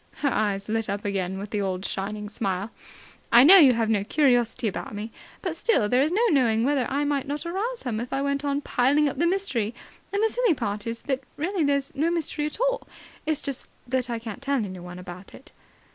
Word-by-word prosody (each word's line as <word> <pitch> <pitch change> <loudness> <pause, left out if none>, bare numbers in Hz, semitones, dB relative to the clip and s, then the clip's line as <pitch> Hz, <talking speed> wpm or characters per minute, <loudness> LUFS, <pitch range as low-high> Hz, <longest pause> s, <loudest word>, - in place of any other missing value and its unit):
Her 280 - +2
eyes 200 -2 0
lit 225 -1 -1
up 200 +1 -3
again 190 -2 -2
with 200 +1 -7
the 210 - -1
old 190 -1 -2
shining 210 +2 -3
smile. 200 0 -3 0.6
"I 235 +1 +8
know 370 +8 +10
you 275 -6 +7
have 230 -1 0
no 210 -3 +1
curiosity 245 -2 +2
about 205 +1 -4
me, 215 +2 -5 0.3
but 360 -4 -2
still 335 - +2
there's 260 +7 +2
no 435 +6 +2
knowing 230 -6 +3
whether 270 -1 +1
I 280 +2 0
might 285 -2 -1
not 290 +3 -4
arouse 420 +8 -3
some 230 -4 -3
if 240 +2 -5
I 270 - 0
went 280 0 -1
on 285 0 0
piling 285 +3 +2
up 275 - -4
the 340 - +3
mystery. 265 - -1 0.4
And 405 +2 0
the 445 - +4
silly 475 -7 +2
part 205 -3 -3
is 230 0 -4
that 270 -2 -1 0.2
really 355 +3 -1
there's 280 -1 0
no 310 +4 +1
mystery 315 -3 -1
at 300 - -7
all. - - 0 0.4
It's 310 -2 0
just 275 -3 -4 0.2
that 255 0 0
I 235 - -1
can't 225 +1 -7
tell 280 0 0
anyone 185 -6 -4
about 180 +1 -10
it." 270 - -15
255 Hz, 220 wpm, -25 LUFS, 210-295 Hz, 0.6 s, know